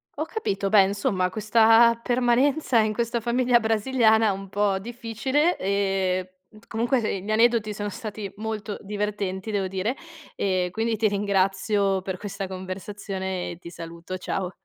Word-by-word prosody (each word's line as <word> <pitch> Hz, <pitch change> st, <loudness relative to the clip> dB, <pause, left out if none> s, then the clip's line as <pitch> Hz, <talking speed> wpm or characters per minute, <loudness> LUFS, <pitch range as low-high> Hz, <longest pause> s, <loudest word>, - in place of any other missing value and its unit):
Ho 310 Hz, -, -2 dB
capito. 200 Hz, -, -2 dB
Beh, 200 Hz, -1 st, +7 dB
insomma, 190 Hz, -1 st, 0 dB
questa 225 Hz, +2 st, +5 dB
permanenza 250 Hz, +2 st, +2 dB
in 215 Hz, -1 st, +2 dB
questa 235 Hz, +1 st, -1 dB
famiglia 240 Hz, +1 st, +2 dB
brasiliana 220 Hz, 0 st, +3 dB
è -, -, +3 dB
un 195 Hz, 0 st, -6 dB
po' 200 Hz, -1 st, +1 dB
difficile, 240 Hz, -, -1 dB
ehm 195 Hz, -2 st, 0 dB, 0.4 s
Comunque 230 Hz, -3 st, 0 dB
gli 200 Hz, -, -8 dB
aneddoti 220 Hz, -1 st, +3 dB
sono 205 Hz, +1 st, -4 dB
stati 210 Hz, -2 st, -6 dB
molto 215 Hz, -1 st, -4 dB
divertenti, 205 Hz, -1 st, -3 dB
devo 200 Hz, -2 st, 0 dB
dire, 195 Hz, +8 st, -2 dB, 0.4 s
e 185 Hz, -2 st, 0 dB
quindi 225 Hz, +3 st, -1 dB
ti 215 Hz, 0 st, +2 dB
ringrazio 195 Hz, 0 st, +1 dB
per 190 Hz, 0 st, -4 dB
questa 200 Hz, -1 st, -5 dB
conversazione 190 Hz, 0 st, -5 dB
e 170 Hz, -, -8 dB
ti 170 Hz, -, -10 dB
saluto. 170 Hz, +2 st, -7 dB
Ciao. 185 Hz, 0 st, -3 dB
205 Hz, 145 wpm, -25 LUFS, 190-230 Hz, 0.4 s, Beh